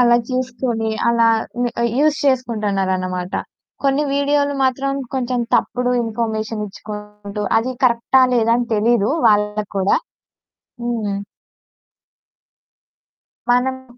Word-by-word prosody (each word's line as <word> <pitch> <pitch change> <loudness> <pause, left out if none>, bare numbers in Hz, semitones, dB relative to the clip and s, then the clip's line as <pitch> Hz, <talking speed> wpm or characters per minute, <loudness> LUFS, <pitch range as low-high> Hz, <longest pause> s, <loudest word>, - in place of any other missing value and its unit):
అలా 240 -1 +6
చూసుకొని 245 -3 -1 0.2
అలా 230 -1 +4 0.3
హ్మ్, 245 0 +1 0.3
యూజ్ 300 0 +3
చేసుకుంటున్నారనమాట. 195 -8 0 0.5
కొన్ని 275 +2 +3
వీడియోలు 285 0 +1
మాత్రం 275 +1 0 0.2
కొంచెం 250 -1 -1
తప్పుడు 250 0 +1
ఇన్ఫర్మేషన్ 220 -1 -2
ఇచ్చుకుంటూ 210 0 -8 0.2
అది 250 +3 -2
కరెక్టా 245 +2 +4
లేదా 230 -1 +3
అని 240 -1 -1
తెలీదు 220 0 +2 0.2
వాళ్ళకు 210 0 +1
కూడా. 190 +1 +3 0.9
హ్మ్. 220 -4 -2 2.3
మనం 255 0 0
235 Hz, 95 wpm, -19 LUFS, 210-255 Hz, 2.3 s, అలా